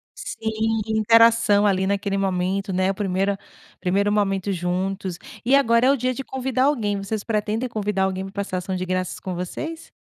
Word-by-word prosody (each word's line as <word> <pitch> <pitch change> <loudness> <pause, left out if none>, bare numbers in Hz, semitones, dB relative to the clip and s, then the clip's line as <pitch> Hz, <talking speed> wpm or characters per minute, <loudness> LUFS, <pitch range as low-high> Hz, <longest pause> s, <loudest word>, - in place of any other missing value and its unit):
Sim, 220 0 -2
interação 220 -1 +5
ali, 190 -1 +2
naquele 200 0 0
momento, 195 +1 -1
né? 185 +1 +1
O - - -3
primeiro 195 0 0 0.4
primeiro 200 +3 +1
momento 200 -1 0
juntos. 185 +1 -2 0.3
E 260 +4 +4
agora 235 -2 +4
é - - +6
o 280 - +2
dia 255 +1 0
de 270 - -5
convidar 260 0 -1
alguém. 220 -8 +1
Vocês 200 +1 -3
pretendem 220 +2 -1
convidar 210 -4 -1
alguém 190 0 -1
pra 195 - -10
passar 185 -2 -4
Ação 185 +1 -3
de 185 0 -2
Graças 185 0 -2
com 185 - -5
vocês? 310 - -5
200 Hz, 180 wpm, -23 LUFS, 190-225 Hz, 0.4 s, é